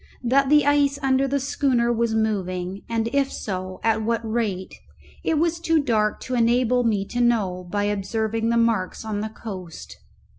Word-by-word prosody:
That 265 Hz, +3 st, +3 dB
the 295 Hz, -1 st, +5 dB
ice 285 Hz, -1 st, +3 dB
under 270 Hz, 0 st, +2 dB
the 280 Hz, +1 st, 0 dB
schooner 255 Hz, -3 st, +1 dB
was 230 Hz, -1 st, 0 dB
moving, 190 Hz, -3 st, -2 dB
and 225 Hz, -1 st, 0 dB
if 280 Hz, -1 st, +1 dB
so, 185 Hz, -2 st, -5 dB
at 225 Hz, -1 st, +2 dB
what 230 Hz, +1 st, 0 dB
rate, 215 Hz, -5 st, -2 dB, 0.5 s
it 320 Hz, -, +1 dB
was 335 Hz, +2 st, +1 dB
too 330 Hz, -1 st, +2 dB
dark 220 Hz, -7 st, +1 dB
to 255 Hz, -, -5 dB
enable 245 Hz, +1 st, +2 dB
me 210 Hz, -4 st, +1 dB
to 245 Hz, +4 st, -3 dB
know 195 Hz, -7 st, +1 dB
by 205 Hz, +3 st, -1 dB
observing 220 Hz, +3 st, -1 dB
the 235 Hz, -, +2 dB
marks 225 Hz, -3 st, 0 dB
on 210 Hz, -2 st, -2 dB
the 220 Hz, -, -3 dB
coast. 190 Hz, -6 st, -9 dB
230 Hz, 175 wpm, -23 LUFS, 205-255 Hz, 0.5 s, the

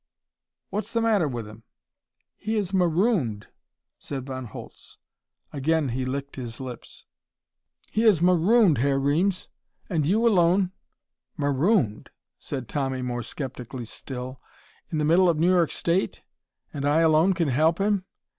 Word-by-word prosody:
"What's 210 Hz, +2 st, -3 dB
the 230 Hz, -, +2 dB
matter 215 Hz, -8 st, +2 dB
with 120 Hz, -5 st, -5 dB
him?" 105 Hz, +1 st, -12 dB, 0.7 s
"He 220 Hz, +2 st, -3 dB
is 200 Hz, -3 st, -1 dB
marooned," 175 Hz, -, +1 dB, 0.5 s
said 135 Hz, -2 st, -6 dB
Von 130 Hz, -1 st, -5 dB
Holtz. 105 Hz, -, -11 dB, 0.6 s
Again 150 Hz, 0 st, +1 dB
he 130 Hz, +2 st, -2 dB
licked 140 Hz, +2 st, -4 dB
his 120 Hz, -3 st, -6 dB
lips. 130 Hz, -2 st, -9 dB, 0.9 s
"He 220 Hz, -, +1 dB
is 215 Hz, -7 st, +5 dB
marooned, 180 Hz, -, +4 dB
Herr 135 Hz, +2 st, +2 dB
Reames, 170 Hz, +8 st, +1 dB, 0.4 s
and 160 Hz, -4 st, +1 dB
you 220 Hz, +6 st, +3 dB
alone 180 Hz, -2 st, +3 dB, 0.3 s
" -, -, -53 dB
"Marooned?" 140 Hz, -, +1 dB, 0.3 s
said 130 Hz, -4 st, -5 dB
Tommy 135 Hz, -2 st, -2 dB
more 120 Hz, -1 st, -3 dB
skeptically 125 Hz, -1 st, -6 dB
still. 130 Hz, +2 st, -7 dB, 0.5 s
"In 160 Hz, -, -2 dB
the 150 Hz, -, +1 dB
middle 175 Hz, +4 st, +5 dB
of 165 Hz, -, +1 dB
New 170 Hz, +4 st, +3 dB
York 175 Hz, -3 st, +3 dB
State? 175 Hz, +3 st, -1 dB, 0.5 s
And 140 Hz, -2 st, -4 dB
I 145 Hz, +3 st, +3 dB
alone 165 Hz, +4 st, +4 dB
can 170 Hz, -5 st, 0 dB
help 155 Hz, +6 st, +2 dB
him? 200 Hz, -1 st, 0 dB
155 Hz, 145 wpm, -25 LUFS, 130-185 Hz, 0.9 s, is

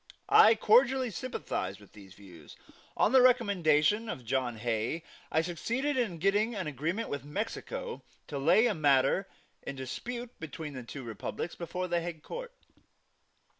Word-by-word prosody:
I 225 Hz, +1 st, +8 dB
cordially 250 Hz, +3 st, +4 dB
sympathized 140 Hz, -, -4 dB
with 100 Hz, -, -18 dB
these 100 Hz, -2 st, -14 dB
views. 90 Hz, -7 st, -14 dB, 0.4 s
On -, -, +3 dB
the 260 Hz, -1 st, +7 dB
recommendation 205 Hz, -, +3 dB
of 125 Hz, -, -6 dB
John 125 Hz, -1 st, -1 dB
Hay, 115 Hz, +7 st, -2 dB, 0.3 s
I 160 Hz, -, +3 dB
succeeded 235 Hz, -, -2 dB
in 230 Hz, -9 st, -1 dB
getting 205 Hz, +6 st, +1 dB
an 190 Hz, -3 st, -3 dB
agreement 160 Hz, -, -2 dB
with 140 Hz, -2 st, -4 dB
Mexico 345 Hz, -, -5 dB, 0.2 s
to 140 Hz, -, -5 dB
lay 215 Hz, -, +5 dB
a 235 Hz, -, +2 dB
matter 145 Hz, +3 st, +3 dB, 0.3 s
in -, -, -6 dB
dispute 240 Hz, -, -6 dB
between 155 Hz, -1 st, -7 dB
the 130 Hz, -, -6 dB
two 130 Hz, +3 st, -8 dB
republics 120 Hz, +8 st, -5 dB
before 180 Hz, +1 st, -4 dB
the 175 Hz, -1 st, 0 dB
Hague 165 Hz, -2 st, -6 dB
Court. 485 Hz, 0 st, -7 dB
170 Hz, 150 wpm, -30 LUFS, -, 0.4 s, I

